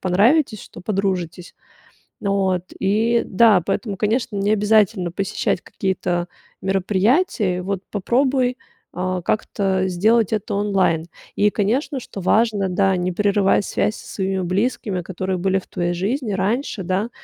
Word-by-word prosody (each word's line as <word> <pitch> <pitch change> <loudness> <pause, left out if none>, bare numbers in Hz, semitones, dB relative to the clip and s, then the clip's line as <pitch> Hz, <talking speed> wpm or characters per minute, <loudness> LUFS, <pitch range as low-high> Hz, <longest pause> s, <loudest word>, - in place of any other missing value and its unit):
понравитесь, 215 - +2
что - - -12
подружитесь. 185 -3 -2 0.7
Вот 190 -3 0 0.2
и 225 +4 +2
да, 205 -2 +5
поэтому, 205 -5 -2
конечно, 220 0 0
не 200 +2 +1
обязательно 210 -4 +2
посещать 195 -1 -1
какие-то 180 -2 -2 0.3
мероприятия. 195 - +1
Вот 195 0 -3
попробуй, 255 +4 +1 0.4
а, 185 0 -2
как-то 190 -1 0
сделать 215 +4 +2
это 210 -2 -2
онлайн. 195 -5 +1 0.3
И, 210 0 +4
конечно, 250 +7 -1
что 200 - -9
важно, 210 0 +2
да, 190 +1 +2
не 180 0 -1
прерывать 200 +1 +2
связь 215 - 0
со - - -12
своими 190 -1 -1
близкими, 190 0 -1
которые 185 +1 -3
были 190 +1 +1
в - - -17
твоей 175 0 -2
жизни 210 +5 -2
раньше, 205 +2 -1
да. 190 +6 -1
195 Hz, 130 wpm, -21 LUFS, 185-215 Hz, 0.7 s, да